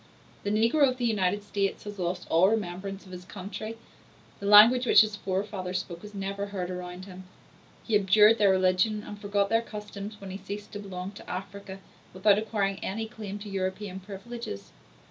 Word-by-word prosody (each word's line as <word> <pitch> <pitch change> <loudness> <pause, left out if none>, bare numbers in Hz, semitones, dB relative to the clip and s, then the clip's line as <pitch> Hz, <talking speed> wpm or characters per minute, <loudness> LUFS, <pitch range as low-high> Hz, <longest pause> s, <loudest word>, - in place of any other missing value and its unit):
The 205 - -2
negro 230 +7 +4
of 255 - -3
the 245 - -1
United 205 -2 +1
States 200 -1 -2
has 205 -1 -8
lost 180 0 -2
all 170 +4 +5
remembrance 195 -2 -3
of 185 - -13
his 180 0 -8
country; 205 +4 -7 0.6
the 200 - -4
language 230 +5 +8
which - - +8
his 215 -1 0
forefathers 190 -1 -3
spoke 170 -2 -6
is 210 0 -10
never 200 +1 -3
heard 185 -3 -4
around 180 0 -6
him; 185 -1 -11 0.6
he 225 - -5
abjured 210 +3 +6
their 205 -2 +5
religion 190 +3 +2
and 205 -1 -9
forgot 200 -1 +1
their 225 +1 +3
customs 210 -1 -8
when 195 -1 -8
he 190 - -5
ceased 200 +2 -7
to 205 - -6
belong 190 -2 -6
to 205 - -12
Africa, 195 +1 -6 0.4
without 200 +2 +4
acquiring 205 -3 -1
any 220 +3 -3
claim 210 -3 -7
to 205 +1 -9
European 190 0 -3
privileges. 195 - -8
200 Hz, 185 wpm, -28 LUFS, 185-210 Hz, 0.6 s, language